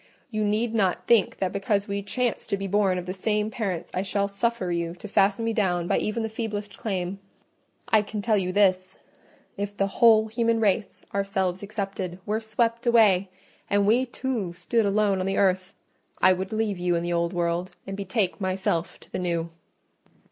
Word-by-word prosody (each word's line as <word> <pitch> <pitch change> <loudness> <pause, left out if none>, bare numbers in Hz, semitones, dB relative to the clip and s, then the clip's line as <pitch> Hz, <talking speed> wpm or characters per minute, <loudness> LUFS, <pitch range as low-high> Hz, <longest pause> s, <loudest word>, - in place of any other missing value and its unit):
You 215 -1 -1
need 215 +3 0
not 195 -5 +1
think 230 -4 +3
that 190 - -1
because 200 0 0
we 200 0 -2
chanced 240 +4 -2
to 200 - +1
be 195 - -4
born 195 -1 +2
of 180 - -4
the 180 - -4
same 210 +2 -1
parents, 195 -7 -3
I 185 - 0
shall 200 +1 0
suffer 200 -2 -1
you 170 0 -2
to 185 - -9
fasten 200 +2 +2
me 225 - 0
down 180 -5 0
by - - +2
even 225 +2 -2
the - - -1
feeblest 210 -3 -4
claim: 190 -2 -3 0.7
I 220 - +4
can 210 0 -5
tell 215 +1 +2
you 185 -1 -1
this—if 195 +1 -2
the 195 - +2
whole 220 +2 +5
human 230 0 +1
race, 210 -1 0
ourselves 195 -2 -1
excepted, 195 -3 -4
were 215 +1 0
swept 230 +2 -1
away, 205 -5 +5 0.4
and 200 0 +3
we 240 +5 +3
two 240 -8 -3
stood 205 +5 0
alone 200 -1 +2
on 185 - -1
the 195 - -1
earth, 190 -1 +1 0.4
I 185 - +6
would 190 +2 -4
leave 215 -3 -1
you 175 0 +1
in 170 - -1
the 175 0 -1
old 170 0 0
world, 175 +1 -1
and 195 - -5
betake 200 0 -1
myself 185 -3 -1
to - - -18
the - - -3
new." 170 -2 -2
200 Hz, 190 wpm, -26 LUFS, 185-215 Hz, 0.7 s, I